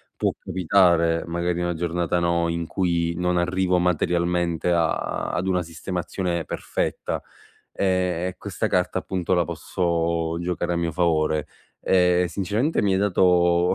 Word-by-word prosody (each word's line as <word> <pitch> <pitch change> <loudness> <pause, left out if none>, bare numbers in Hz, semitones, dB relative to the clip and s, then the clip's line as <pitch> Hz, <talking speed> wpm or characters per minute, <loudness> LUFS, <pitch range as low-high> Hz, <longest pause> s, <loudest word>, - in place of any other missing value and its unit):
può - - 0
capitare 85 -2 +2
magari 85 +1 -1
in 85 - -1
una 85 -1 -1
giornata 85 +1 -1
no 85 0 +1
in 85 0 -2
cui 85 -1 0
non 90 0 0
arrivo 90 +1 +1
materialmente 85 0 0
a 85 -2 0
ad 90 - -2
una 90 -1 +1
sistemazione 85 +1 -3
perfetta, - - -3 0.5
ehm, 90 -2 0
e 90 - -5
questa - - -3
carta - - 0
appunto 95 -1 -2
la 85 -2 +2
posso 85 -1 -1
giocare 85 0 -2
a - - -1
mio 85 -1 -1
favore. 80 -2 +1 0.3
Ehm, 90 -1 +3
sinceramente 105 - 0
mi 100 -2 +2
hai 95 - +2
dato 90 -2 +3
85 Hz, 145 wpm, -24 LUFS, 85-90 Hz, 0.5 s, Ehm